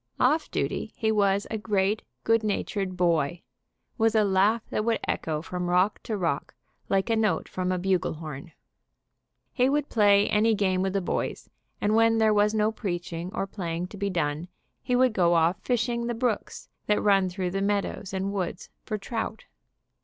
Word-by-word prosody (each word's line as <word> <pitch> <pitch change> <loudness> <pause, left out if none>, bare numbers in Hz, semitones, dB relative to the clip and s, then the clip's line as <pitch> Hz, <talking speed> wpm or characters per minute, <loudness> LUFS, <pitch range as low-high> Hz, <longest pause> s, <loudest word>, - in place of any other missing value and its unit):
Off 300 +6 +2
duty - - -2
he 220 -1 +1
was 200 -1 +2
a 220 - -2
great, 205 0 0 0.2
good 225 0 +3
natured 195 -2 -2
boy, 170 -2 +1 0.6
with 225 0 +3
a 215 - +5
laugh 205 +3 +2
that 215 - 0
would 230 0 +1
echo 155 -1 -2
from 180 +1 -3
rock 185 +4 +2
to 220 - -3
rock 165 -7 -2 0.3
like 195 -1 +2
a - - +3
note 215 -7 +1
from 185 0 -2
a 185 - 0
bugle 185 -1 0
horn. 155 -2 -8 1.0
He 255 0 +3
would 290 0 0
play 205 -2 +4
any 220 +1 +3
game 190 -2 +1
with 190 0 -1
the 195 - +1
boys, 175 - -3 0.3
and 210 - +1
when 225 0 +4
there 220 -1 +4
was 210 +1 +3
no 215 0 +2
preaching 175 -5 -4
or - - -1
playing 180 -3 -4
to 205 - -10
be 200 0 -1
done 160 -2 -1 0.3
he 250 - 0
would 255 -1 +4
go 175 -4 +3
off 165 +2 +2
fishing 240 -1 0
the 240 - -2
brooks 230 -2 -2 0.2
that 210 - +3
run 195 -2 +3
through 180 0 -3
the 195 +1 -2
meadows 200 0 -1
and 195 +1 -2
woods 185 -2 -4 0.2
for 215 - -1
trout. 220 +1 -4
200 Hz, 185 wpm, -27 LUFS, 180-220 Hz, 1.0 s, a